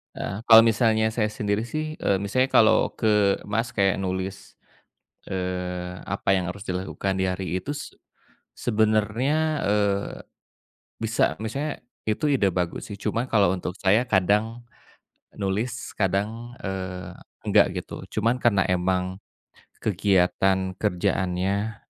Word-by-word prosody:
Eee, 105 Hz, +4 st, -5 dB
kalau 115 Hz, -1 st, +10 dB
misalnya 110 Hz, -1 st, +3 dB
saya 110 Hz, 0 st, 0 dB
sendiri 105 Hz, -1 st, -1 dB
sih, 155 Hz, +4 st, -4 dB
eee, 95 Hz, -1 st, +1 dB
misalnya 130 Hz, +6 st, +1 dB
kalau 110 Hz, -, +5 dB
ke, 105 Hz, -3 st, +2 dB
Mas, 115 Hz, +3 st, -1 dB
kayak 100 Hz, -1 st, +2 dB
nulis, 95 Hz, +1 st, -4 dB, 0.8 s
eee, 90 Hz, -1 st, -4 dB
apa 100 Hz, -, -5 dB
yang 90 Hz, -2 st, 0 dB
harus 100 Hz, +2 st, -9 dB
dilakukan 95 Hz, +1 st, -2 dB
di 95 Hz, 0 st, 0 dB
hari 90 Hz, -1 st, -3 dB
itu -, -, -5 dB, 0.9 s
sebenarnya, 110 Hz, +4 st, +1 dB, 0.3 s
eee, 100 Hz, -1 st, +1 dB, 0.9 s
bisa, 110 Hz, +1 st, +1 dB
maksudnya 135 Hz, +8 st, -4 dB, 0.2 s
itu 110 Hz, +7 st, 0 dB
ide 125 Hz, -8 st, +3 dB
bagus 90 Hz, -2 st, -2 dB
sih. 105 Hz, -, -6 dB
Cuma 110 Hz, +5 st, -2 dB
kalau 100 Hz, -7 st, +3 dB
untuk 90 Hz, -1 st, -3 dB
saya 105 Hz, +5 st, +2 dB
kadang 105 Hz, +3 st, +1 dB, 0.7 s
nulis 105 Hz, +4 st, -3 dB
kadang, 105 Hz, +5 st, -1 dB
eee, 95 Hz, -1 st, -5 dB, 0.3 s
enggak -, -, +3 dB
gitu. -, -, -7 dB
Cuman 115 Hz, +4 st, 0 dB
karena 105 Hz, -7 st, +3 dB
emang 90 Hz, +1 st, 0 dB, 0.7 s
kegiatan 95 Hz, -1 st, +2 dB
kerjaannya 100 Hz, +1 st, 0 dB
100 Hz, 120 wpm, -25 LUFS, 95-110 Hz, 0.9 s, kalau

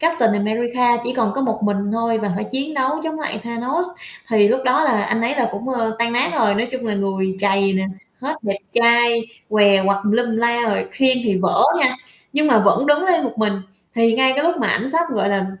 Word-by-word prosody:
Captain 315 Hz, -9 st, +2 dB
America 240 Hz, +4 st, +1 dB
chỉ 250 Hz, +1 st, -3 dB
còn 225 Hz, -5 st, 0 dB
có 275 Hz, -, -2 dB
một 225 Hz, -4 st, -1 dB
mình 205 Hz, -1 st, +1 dB, 0.2 s
thôi 230 Hz, 0 st, 0 dB
và 210 Hz, -2 st, -3 dB
phải 205 Hz, -, -3 dB
chiến 270 Hz, +6 st, -4 dB
đấu 265 Hz, -1 st, 0 dB
chống 315 Hz, 0 st, -4 dB
lại 215 Hz, -8 st, -3 dB
Thanos, 245 Hz, +9 st, -2 dB, 0.4 s
thì 210 Hz, -2 st, +4 dB
lúc 260 Hz, -, +1 dB
đó 255 Hz, +5 st, +2 dB
là 230 Hz, -7 st, +1 dB
anh 230 Hz, -, -1 dB
ấy 240 Hz, +5 st, 0 dB
là 245 Hz, -3 st, +1 dB
cũng, 240 Hz, +6 st, -6 dB
ơ, 225 Hz, -3 st, -2 dB
tan 235 Hz, 0 st, 0 dB
nát 245 Hz, +3 st, +1 dB
rồi. 210 Hz, -3 st, +2 dB
Nói 230 Hz, +3 st, -1 dB
chung 255 Hz, -2 st, -4 dB
là 215 Hz, -, -2 dB
người 195 Hz, -1 st, -2 dB
trầy 195 Hz, -1 st, +2 dB
nè, 190 Hz, 0 st, -1 dB, 0.4 s
hết 295 Hz, +4 st, -3 dB
đẹp 200 Hz, -2 st, -2 dB
trai, 235 Hz, 0 st, +4 dB, 0.3 s
què 200 Hz, -2 st, +4 dB
quặt 200 Hz, 0 st, +2 dB
tùm 205 Hz, -, +1 dB
lum 240 Hz, +2 st, +1 dB
tùm 225 Hz, -, -2 dB
la 235 Hz, +1 st, +1 dB
rồi, 205 Hz, -, -1 dB
khiên 265 Hz, -2 st, +2 dB
thì 205 Hz, -4 st, +1 dB
vỡ -, -, +2 dB, 0.2 s
nha, 255 Hz, -4 st, +2 dB, 0.4 s
nhưng 300 Hz, +2 st, +1 dB
mà 240 Hz, -5 st, +4 dB
vẫn 225 Hz, +5 st, +2 dB
đứng 295 Hz, +5 st, +3 dB
lên 355 Hz, -2 st, +2 dB
một 240 Hz, -, -3 dB
mình. 215 Hz, -1 st, +1 dB, 0.4 s
Thì 230 Hz, -1 st, +3 dB
ngay 260 Hz, +2 st, +3 dB
cái 285 Hz, -, 0 dB
lúc 340 Hz, 0 st, +2 dB
mà -, -, +1 dB
ảnh 235 Hz, +5 st, 0 dB
sắp, 325 Hz, +4 st, +2 dB
gọi 210 Hz, -5 st, 0 dB
là, 195 Hz, -1 st, 0 dB
235 Hz, 240 wpm, -19 LUFS, 210-260 Hz, 0.4 s, thì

